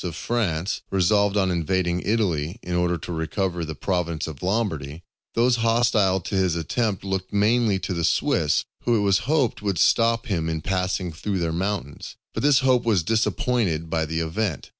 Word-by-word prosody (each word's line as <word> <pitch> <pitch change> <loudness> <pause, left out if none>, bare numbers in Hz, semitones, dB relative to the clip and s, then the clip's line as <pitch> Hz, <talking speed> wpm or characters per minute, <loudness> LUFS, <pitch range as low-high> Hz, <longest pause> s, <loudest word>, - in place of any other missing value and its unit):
of 85 -3 -4
France 95 -2 -1
resolved 100 +2 +2
on 95 -2 +2
invading 85 +1 0
Italy 90 -6 0
in 90 - -4
order 90 0 +1
to 90 - -8
recover 85 +2 -2
the 80 -1 -5
province 85 0 -2
of 75 -4 -8
Lombardy, 90 -7 -2 0.3
those 120 +1 +3
hostile 115 -4 +2
to - - -7
his 95 -3 +2
attempt 95 +4 -1
looked 95 -1 -3
mainly 105 0 +2
to 95 0 -4
the 85 -1 -2
Swiss, - - +1 0.2
who 120 - +2
it 105 - +2
was 100 -2 +3
hoped 145 -9 +1
would 100 -3 -1
stop 115 - +3
him 85 -8 -1
in 80 -1 -2
passing 90 0 -1
through 95 +5 -3
their 85 -2 -1
mountains. 95 -5 -4 0.2
But - - -3
this 145 -2 +5
hope 130 -2 +3
was 105 -7 +2
disappointed 110 -5 0
by 80 -1 0
the 80 +1 -2
event. 80 +2 -2
95 Hz, 180 wpm, -24 LUFS, 85-110 Hz, 0.3 s, this